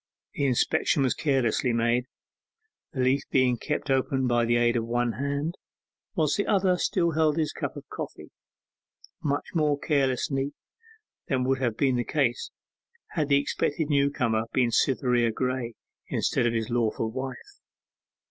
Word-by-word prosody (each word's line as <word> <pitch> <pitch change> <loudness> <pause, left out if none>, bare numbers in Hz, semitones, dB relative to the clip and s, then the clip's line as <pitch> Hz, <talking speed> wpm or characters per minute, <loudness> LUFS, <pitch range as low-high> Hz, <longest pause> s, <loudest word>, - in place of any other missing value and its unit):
The 140 - 0
inspection 140 +3 +2
was 130 - +2
carelessly 130 -3 +1
made, 120 +2 +1 0.8
the 130 - -2
leaf 130 +2 +3
being 130 -2 +3
kept 150 +2 -2
open 135 0 +1
by 120 -1 +2
the 120 +1 +2
aid 120 0 +3
of 115 - +1
one 120 0 +1
hand, 140 +7 -2 0.6
whilst 155 -5 +1
the 205 - 0
other 190 -3 +3
still 175 -4 +1
held 155 -1 +2
his 155 -2 0
cup - - -4
of - - -10
coffee; - - -7 0.9
much 145 -1 -1
more 150 -4 +2
carelessly 135 -1 0 0.7
than 130 -6 +1
would 130 +1 +1
have 120 -4 -1
been 130 -3 +2
the 120 - 0
case 135 -3 0 0.6
had 155 -4 -1
the 140 - +5
expected 145 +2 -1
new 140 -1 +3
comer 115 -5 0
been 125 -2 +2
Cytherea 125 -2 +2
Graye, 125 0 -2 0.3
instead 120 - +1
of 115 - 0
his 115 +1 -2
lawful 115 -1 0
wife. 130 0 -7
130 Hz, 155 wpm, -27 LUFS, 120-145 Hz, 0.9 s, the